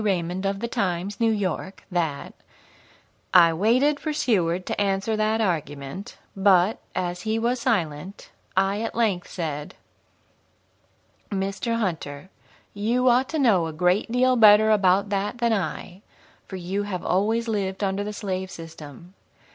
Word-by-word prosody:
Raymond, 185 -1 -1
of 195 0 -3
the 235 - -1
Times, 190 -2 -2
New 230 -1 +3
York, 190 -2 -3
that: 165 -5 -2 1.0
"I 170 -2 +7
waited 250 - +2
for 310 - -3
Seward 185 - 0
to - - -2
answer 200 +2 0
that 215 +1 +1
argument, 155 -2 -3 0.2
but, 195 +1 +3 0.2
as 180 0 -2
he 220 +2 -1
was 240 +2 0
silent, 180 -4 -2 0.3
I 195 +2 +2
at 225 - -4
length 210 -7 0
said: 150 -4 -5 1.5
'Mr. 195 +4 -2
Hunter, 175 -6 -4 0.4
you 235 +5 +1
ought 250 +2 +3
to 320 - -2
know 210 - +3
a 160 - -6
great 180 +7 +1
deal 255 +1 +3
better 215 -1 +7
about 200 -1 +3
that 200 +3 -2
than 235 -1 +1
I, 185 0 -4 0.5
for 190 - -7
you 185 +2 -3
have 200 -3 -5
always 220 +5 +1
lived 200 -3 -2
under 195 +1 -1
the 210 - -4
slave 190 -3 -4
system. 165 0 -11
195 Hz, 145 wpm, -24 LUFS, 180-220 Hz, 1.5 s, I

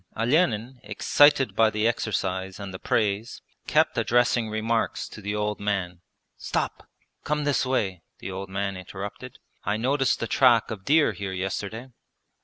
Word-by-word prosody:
Olenin, 125 -1 +1
excited 135 +6 +3
by 110 -1 +5
the 105 +1 0
exercise 95 -4 -2
and 100 -2 -7
the 95 - -7
praise, 105 +1 -1 0.2
kept - - +3
addressing 120 -1 +2
remarks 110 +1 -1
to 105 - -11
the 105 +1 -3
old 105 0 -1
man. 95 -4 -2 0.4
'Stop! - - -3 0.3
Come 150 0 -1
this 145 -2 +1
way,' 95 -9 -1 0.2
the 95 - -7
old 95 0 -6
man 100 0 -2
interrupted. 100 +6 -8 0.3
'I 105 +2 0
noticed 135 +3 +1
the - - -1
track 120 -1 +4
of 100 -3 -7
deer 155 +1 +4
here 100 -2 -5
yesterday.' 100 +6 -4
105 Hz, 150 wpm, -26 LUFS, 100-120 Hz, 0.4 s, by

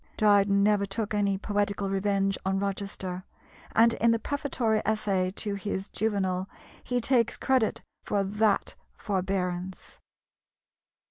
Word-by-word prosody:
Dryden 200 -1 +4
never 205 -1 +3
took 210 +2 -3
any 200 -2 +1
poetical 200 -1 -1
revenge 195 0 +1
on 190 0 0
Rochester, 195 -2 -3 0.5
and 230 +1 +6
in 235 - +2
the 230 - +4
prefatory 240 -4 -1
essay 200 -4 0
to 205 -2 -2
his 200 0 -4
Juvenal 190 -3 -1 0.3
he 245 -1 0
takes 235 -1 +2
credit 260 -5 +1 0.2
for 200 -1 0
that 210 +1 +1 0.2
forbearance. 185 -2 -3
200 Hz, 120 wpm, -28 LUFS, 195-220 Hz, 0.5 s, and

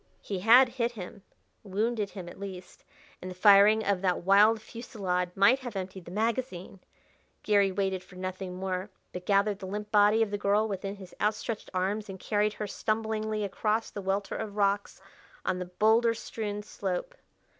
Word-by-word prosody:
He 195 -3 -3
had 240 +7 +7
hit 240 -1 -2
him 200 -1 -9 0.4
wounded 210 +1 -1
him 185 -4 -8
at 175 - -11
least 190 -2 -9 0.4
and 185 - -6
the 180 - -8
firing 205 +3 +6
of 195 -2 +1
that 180 -3 0
wild 205 +4 +5
fusillade 200 -6 -3
might 235 +7 +5
have 245 -5 -7
emptied 190 -1 -6
the - - -9
magazine! 215 -3 -2 0.6
Gary 200 -2 +3
waited 190 -1 -1
for 180 - -17
nothing 185 0 -5
more, 185 +1 -3 0.2
but 180 0 -7
gathered 200 0 +2
the 190 - -7
limp 210 +2 -5
body 210 +1 +5
of 210 - -4
the 205 - -2
girl 205 +2 +2
within 195 -1 -4
his 190 -2 -12
outstretched 215 +1 -2
arms 195 +3 -1
and 190 -1 -7
carried 210 +1 0
her 215 - -4
stumblingly 215 0 -2
across 215 +3 -1
the 200 - -6
welter 195 +1 -2
of 215 -2 -5
rocks 200 0 0 0.4
on 180 - 0
the 180 - -3
boulder 220 +5 +3
strewn 210 -2 -5
slope. 200 - -4
205 Hz, 175 wpm, -29 LUFS, 190-215 Hz, 0.6 s, had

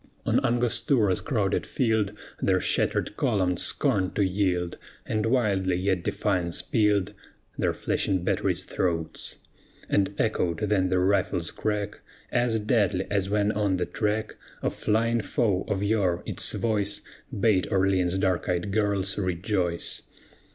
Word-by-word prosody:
On - - +2
Angostura's 120 -3 +2
crowded 105 -7 0
field 110 -5 0 0.3
Their 95 -1 +3
shattered 105 - 0
columns 95 - +1
scorned 95 -2 0
to 100 - +3
yield, 90 -2 0 0.3
And 110 0 0
wildly 100 -7 +2
yet 95 0 0
defiance 90 -3 0
pealed 105 -2 +2 0.4
Their - - +1
flashing 95 -2 -1
batteries' - - 0
throats; 80 -3 -2 0.5
And 100 0 +1
echoed 90 -7 0
then 100 -3 +2
the 95 - +2
rifle's 90 -3 +1
crack, 105 -1 -2 0.3
As 120 -2 +2
deadly 105 -4 +1
as 100 -1 0
when 105 0 +2
on 105 -3 +1
the 90 - 0
track 110 0 -2 0.3
Of - - 0
flying 115 +2 +1
foe, 100 -2 0
of 100 0 -1
yore, 100 -5 +1
its - - -1
voice 105 -3 0 0.4
Bade 100 -4 +3
Orleans' 95 -1 +2
dark 95 -2 0
eyed 90 +2 -1
girls 100 -2 0
rejoice. 90 -1 -1
100 Hz, 130 wpm, -26 LUFS, 90-105 Hz, 0.5 s, Their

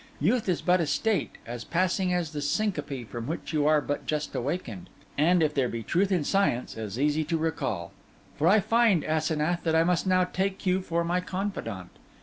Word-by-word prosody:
Youth 210 - +1
is 180 - 0
but 180 0 +3
a 160 - 0
state, 170 +5 0
as 120 0 -6
passing 185 - 0
as 175 -4 -1
that 150 -2 -4
syncope 150 - -1
from 115 0 -6
which 165 +1 -4
you 150 -1 +2
are 155 -1 +4
but 145 0 -4
just 150 -1 -2
awakened, 180 +6 -4 0.3
and, 165 +3 +3
if 150 -1 +1
there 135 -4 +1
be 115 -1 -4
truth 190 - +1
in 180 -5 +2
science, 170 -8 0
as 110 -1 -5
easy 150 +2 +2
to 165 +2 0
recall; 130 - -2 0.4
for 155 - +1
I 205 +4 +6
find, 220 -4 +3
Asenath, 155 +2 0
that 160 -1 0
I 165 - +5
must 180 +2 +1
now 185 0 +4
take 190 +2 -2
you 185 +1 +2
for 170 -2 -1
my 175 +2 0
confidant. 180 - -4
165 Hz, 200 wpm, -27 LUFS, 145-185 Hz, 0.4 s, I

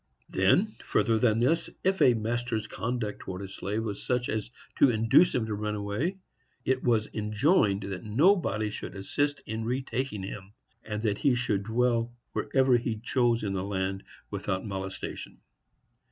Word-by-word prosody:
Then, 180 - +2
further 115 -2 +2
than 115 -2 +3
this, 160 +7 +2
if 190 +1 +1
a 125 -2 +6
master's 115 0 -1
conduct 115 0 -3
towards 95 +1 -6
a - - -7
slave 105 +3 -3
was 105 -3 -4
such 125 -1 0
as 110 0 -2 0.3
to 140 - +7
induce 115 +9 +4
him 120 -3 +1
to 110 - -3
run 105 0 -2
away, 105 - -2 0.5
it 130 0 +1
was 115 -3 +2
enjoined 105 - +2
that 95 -1 -5
nobody 110 - +2
should 105 - -6
assist 145 +9 -1
in 110 +1 -3
retaking 125 -3 -2
him, 95 +1 -7 0.3
and 105 0 -4
that 105 -3 0
he 135 -4 +3
should 120 -5 0
dwell 120 +1 +1 0.2
wherever 130 -2 +3
he 115 -1 -2
chose 120 0 +1
in 100 -2 -1
the 95 -1 -2
land, 95 -1 -2 0.3
without 100 -1 -2
molestation. 95 -2 -5
110 Hz, 160 wpm, -28 LUFS, 100-125 Hz, 0.5 s, to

